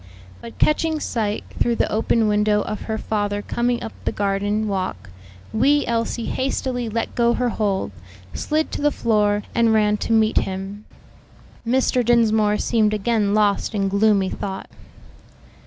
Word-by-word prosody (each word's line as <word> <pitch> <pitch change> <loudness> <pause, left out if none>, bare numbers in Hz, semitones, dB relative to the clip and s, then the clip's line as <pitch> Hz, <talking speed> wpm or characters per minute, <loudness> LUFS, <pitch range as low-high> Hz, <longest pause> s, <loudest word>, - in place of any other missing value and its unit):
But 235 - -10
catching 315 +1 +2
sight, 215 -6 -2 0.2
through 235 - +2
the - - 0
open 225 +1 +2
window, 210 0 +2
of 215 - -5
her 220 - -1
father 205 -1 -2
coming 240 0 -1
up 225 - -5
the - - 0
garden 205 +2 -1
walk, 185 - -3 0.4
wee 280 +6 +3
Elsie 230 0 -1
hastily 255 -2 -2
let 230 +1 -3
go 235 0 +2
her 250 -1 0
hold, 200 - -1 0.4
slid 310 +1 -1
to - - -4
the 295 - +4
floor 210 -5 +1
and 230 -1 +3
ran 210 -1 +3
to 230 - -4
meet 220 -1 +3
him. 195 +2 -5 0.8
Mr. 255 0 +2
Dinsmore 220 -3 +3
seemed 215 -2 +1
again 210 -1 +1
lost 210 +1 +1
in 195 -1 0
gloomy 200 -1 +2
thought. 195 -1 -6
215 Hz, 150 wpm, -21 LUFS, 205-235 Hz, 0.8 s, the